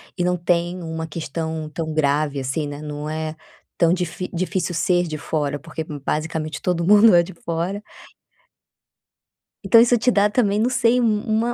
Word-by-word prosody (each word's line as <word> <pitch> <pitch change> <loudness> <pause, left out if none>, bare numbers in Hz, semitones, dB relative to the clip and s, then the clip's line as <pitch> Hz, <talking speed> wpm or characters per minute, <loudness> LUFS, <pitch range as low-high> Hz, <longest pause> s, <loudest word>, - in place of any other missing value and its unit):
e 180 - -1
não 180 0 +1
tem 175 +1 -1
uma 160 0 -4
questão 160 0 -4
tão 160 -1 -3
grave 145 -1 +1
assim, 135 +3 -2
né, 145 0 -7
não 150 0 -6
é 155 0 -4 0.4
tão 170 -1 +4
difi 180 0 -2
difícil 185 0 -2
ser 175 +2 +1
de 155 -1 -4
fora, 145 -2 -2
porque 160 +1 -6
basicamente, 155 +1 -4
todo 170 -2 0
mundo 210 0 +7
é 170 - +6
de - - -10
fora. 170 +4 -3 1.8
Então, 215 +4 +6
isso 240 +1 +5
te 245 +3 +2
dá 205 -3 +4
também, 210 -3 +1
não 230 +3 +2
sei, 240 0 +3
um 215 -3 +2
uma 225 +2 0
170 Hz, 170 wpm, -22 LUFS, 155-195 Hz, 1.8 s, mundo